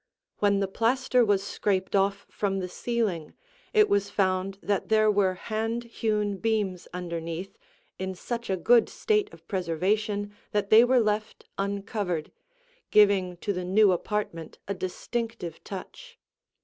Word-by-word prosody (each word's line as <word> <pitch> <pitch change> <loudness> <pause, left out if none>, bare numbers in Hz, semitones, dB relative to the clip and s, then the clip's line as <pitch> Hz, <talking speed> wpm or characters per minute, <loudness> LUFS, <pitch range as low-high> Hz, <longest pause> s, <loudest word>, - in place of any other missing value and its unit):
When 200 -1 +3
the 195 - +1
plaster 245 +4 +2
was 205 -3 +2
scraped 200 -1 -1
off 195 0 +1
from 195 -2 -2
the 185 -1 -2
ceiling, 200 -6 -2 0.4
it 430 -3 +5
was 200 0 +1
found 190 -1 0
that 200 -1 -1
there 215 -1 +4
were 195 -2 +2
hand 225 +4 -2
hewn 210 -3 -1
beams 205 -4 -1
underneath 170 0 -5 0.4
in 190 0 -3
such 235 +5 -5
a 190 - +1
good 235 +7 +4
state 425 -2 0
of - - -16
preservation 205 +3 -1 0.2
that 205 -1 0
they 220 +2 +9
were 250 +1 +4
left 215 -1 -1
uncovered, 200 -4 -2 0.6
giving 195 -4 +4
to 205 - +1
the 180 -1 -3
new 195 +2 +4
apartment 180 -3 -3
a 200 - -1
distinctive 195 +1 -4
touch. 470 - -9
200 Hz, 140 wpm, -27 LUFS, 185-220 Hz, 0.6 s, they